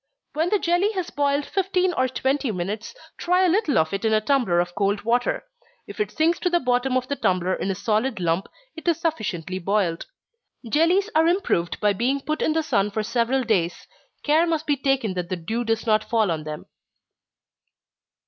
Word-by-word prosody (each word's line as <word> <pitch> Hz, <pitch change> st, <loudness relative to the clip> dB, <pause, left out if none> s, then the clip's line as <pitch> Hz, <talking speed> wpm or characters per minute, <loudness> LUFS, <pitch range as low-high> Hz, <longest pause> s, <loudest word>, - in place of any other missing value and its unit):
When 320 Hz, +4 st, 0 dB
the 420 Hz, -, +3 dB
jelly 370 Hz, +4 st, +1 dB
has 370 Hz, -3 st, -3 dB
boiled 285 Hz, 0 st, 0 dB
fifteen 370 Hz, -1 st, 0 dB
or 260 Hz, -4 st, +1 dB
twenty 265 Hz, 0 st, -1 dB
minutes, 205 Hz, -, -4 dB, 0.2 s
try 360 Hz, +2 st, +2 dB
a -, -, +4 dB
little 350 Hz, -, +2 dB
of 160 Hz, +2 st, +1 dB
it 195 Hz, -, -2 dB
in 220 Hz, -1 st, +2 dB
a 215 Hz, -, +4 dB
tumbler 220 Hz, -7 st, +1 dB
of 175 Hz, 0 st, -1 dB
cold 205 Hz, +1 st, 0 dB
water 240 Hz, +2 st, 0 dB, 0.4 s
if -, -, -11 dB
it 420 Hz, -, 0 dB
sinks 330 Hz, +2 st, +1 dB
to 360 Hz, -, 0 dB
the 345 Hz, 0 st, +2 dB
bottom 250 Hz, 0 st, +1 dB
of 255 Hz, 0 st, -2 dB
the 280 Hz, -, -2 dB
tumbler 185 Hz, -6 st, 0 dB
in 195 Hz, -, -2 dB
a 195 Hz, -, -1 dB
solid 220 Hz, +2 st, 0 dB
lump, 170 Hz, +2 st, 0 dB, 0.3 s
it 320 Hz, -, -10 dB
is 335 Hz, -3 st, +2 dB
sufficiently 190 Hz, -, -2 dB
boiled. 190 Hz, -3 st, -1 dB, 0.6 s
Jellies 350 Hz, -, +2 dB
are 320 Hz, +1 st, +4 dB
improved 340 Hz, -, 0 dB
by 210 Hz, -1 st, +2 dB
being 250 Hz, +7 st, 0 dB
put 305 Hz, +3 st, -3 dB
in 310 Hz, -, +2 dB
the 320 Hz, 0 st, 0 dB
sun 200 Hz, -7 st, +1 dB
for 215 Hz, +1 st, -2 dB
several 240 Hz, +4 st, 0 dB
days 180 Hz, -7 st, 0 dB, 0.4 s
care 315 Hz, +3 st, +3 dB
must 320 Hz, -2 st, -1 dB
be 290 Hz, -, +2 dB
taken 270 Hz, -6 st, 0 dB
that 180 Hz, -1 st, -4 dB
the 185 Hz, -, -1 dB
dew 220 Hz, +8 st, -3 dB
does 225 Hz, 0 st, -1 dB
not 215 Hz, -1 st, +2 dB
fall 220 Hz, -5 st, +2 dB
on 155 Hz, -2 st, -3 dB
them. 150 Hz, -1 st, -6 dB
245 Hz, 200 wpm, -23 LUFS, 200-320 Hz, 0.6 s, a